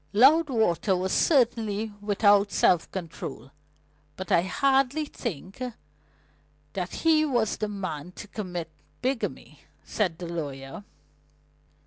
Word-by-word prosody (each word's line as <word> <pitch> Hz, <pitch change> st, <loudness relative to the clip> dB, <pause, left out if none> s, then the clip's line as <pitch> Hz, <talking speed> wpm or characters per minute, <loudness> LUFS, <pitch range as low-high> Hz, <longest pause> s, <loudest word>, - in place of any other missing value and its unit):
"Loudwater 230 Hz, -, +4 dB
was 185 Hz, +1 st, -1 dB
certainly 225 Hz, -6 st, +2 dB
without 205 Hz, 0 st, +4 dB
self 175 Hz, -3 st, +3 dB
control; 160 Hz, -7 st, -7 dB, 0.6 s
but 190 Hz, -1 st, -7 dB
I 170 Hz, -, +5 dB
hardly 275 Hz, -, +2 dB
think 195 Hz, -, -6 dB, 1.1 s
that -, -, -3 dB
he 315 Hz, -1 st, +3 dB
was 240 Hz, -8 st, +1 dB
the 215 Hz, -, -2 dB
man 180 Hz, -5 st, -5 dB
to 205 Hz, -, -9 dB
commit 180 Hz, -6 st, -5 dB, 0.3 s
bigamy," 260 Hz, -1 st, -3 dB, 0.2 s
said 185 Hz, -7 st, -1 dB
the 175 Hz, -, -6 dB
lawyer. 145 Hz, -1 st, -6 dB
205 Hz, 105 wpm, -27 LUFS, 175-245 Hz, 1.1 s, I